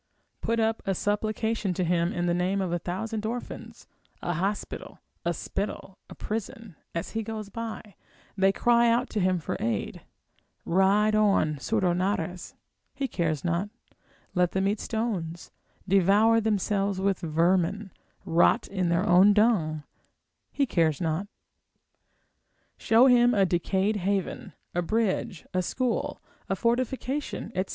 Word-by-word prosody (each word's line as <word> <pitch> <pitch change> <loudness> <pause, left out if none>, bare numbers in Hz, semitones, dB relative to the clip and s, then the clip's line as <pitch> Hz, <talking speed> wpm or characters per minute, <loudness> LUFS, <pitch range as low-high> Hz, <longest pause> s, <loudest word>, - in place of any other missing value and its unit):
Put 230 0 0
up 225 0 +1
a 195 - +1
supplication 215 0 -1
to 185 - 0
him 170 0 +1
in 175 0 -2
the 175 - +1
name 180 +3 0
of 185 -3 -1
a 175 - 0
thousand 210 +6 -4
orphans, 235 +3 -6 0.4
a 175 - -1
hospital, 195 +5 -4 0.2
a 170 - +1
spittle, 195 +2 -5
a - - -10
prison, 220 -2 -5 0.2
as 170 - -3
he 225 - -2
goes 215 -1 -6
by, 220 -1 -6 0.4
they 195 -1 +4
cry 235 +3 +3
out 235 +2 +1
to 215 - -1
him 185 -1 +2
for 165 - -4
aid, 110 -3 -2 0.6
ride 195 +4 +3
on, 200 -8 +3
surdo 185 +3 0
narras, 180 -2 -2 0.4
he 275 0 -2
cares 165 - -2
not, 175 +4 0 0.6
let 180 -1 +1
them 190 0 +1
eat 205 +1 0
stones, 195 -8 -3 0.4
devour 200 +4 +4
themselves 200 -2 0
with 195 -1 +1
vermin, 175 +5 +1 0.3
rot 165 +1 +3
in 190 -3 -1
their 175 +4 +1
own 190 +3 +6
dung, 190 -9 +2 0.7
he 280 - +1
cares 165 - +1
not. 165 +3 -1 1.5
Show 230 +3 +4
him 245 -2 +5
a 195 -2 +4
decayed 190 +4 0
haven, 195 0 -2 0.2
a 175 - 0
bridge, 190 -3 -1
a 185 - +2
school, 245 +6 -2 0.3
a 195 - +1
fortification, 255 +5 -2
etc. 185 +1 -2
195 Hz, 140 wpm, -27 LUFS, 175-220 Hz, 1.5 s, own